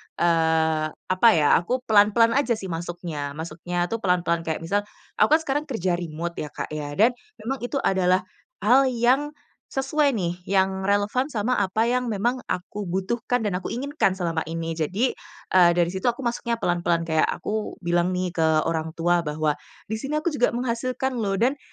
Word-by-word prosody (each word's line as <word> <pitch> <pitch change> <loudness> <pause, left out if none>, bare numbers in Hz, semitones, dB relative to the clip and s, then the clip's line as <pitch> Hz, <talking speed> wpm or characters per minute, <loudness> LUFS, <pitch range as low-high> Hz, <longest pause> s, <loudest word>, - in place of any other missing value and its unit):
eee, 160 -2 +2
apa 185 +5 +2
ya, 150 -2 +4
aku 250 +9 -2
pelan-pelan 220 +1 +5
aja 255 -4 +1
sih 190 -4 -6
masuknya 165 -4 -5
masuknya 170 +2 -3
tuh 230 - -1
pelan-pelan. 175 -4 0
Kayak 160 0 -2
misal, 200 +5 +1 0.4
aku 310 - +6
kan 320 - +1
sekarang 295 +1 -1
kerja 190 - -1
remote 170 0 -5
ya 150 - -3
Kak - - -5
ya, 145 -1 -5
dan 225 +8 +5 0.3
memang 265 +4 -3
itu 245 +4 -4
adalah 185 -1 +2 0.4
hal 260 +6 +5
yang 260 +5 +1 0.4
sesuai 280 +1 +1
nih, 175 -4 -2
yang 190 0 +1
relevan 205 +6 +1
sama 230 +3 0
apa 200 +2 +1
yang 250 +1 +1
memang 230 +3 0
aku 200 +3 -4
butuhkan 230 +7 -1
dan 200 -4 0
aku - - -6
inginkan 275 -5 0
selama 170 -3 -1
ini. 165 0 -3
Jadi, 190 - 0 0.4
eee, 180 -2 +6
dari 170 -1 +3
situ 190 +1 -5
aku 245 +2 +1
masuknya 235 -1 -1
pelan-pelan, 175 -1 +1
kayak 160 -1 +2
aku 215 0 -3
bilang 175 +1 +1
nih 180 0 -1
ke 165 -2 +1 0.2
orang 160 -1 -2
tua 170 0 +2
bahwa 150 0 -1 0.3
di 220 - -2
sini 275 +7 -2
aku 345 - 0
juga 265 -7 +1
menghasilkan 255 +2 -2
loh, 200 -4 0
dan 260 +4 +2
190 Hz, 175 wpm, -24 LUFS, 170-240 Hz, 0.4 s, aku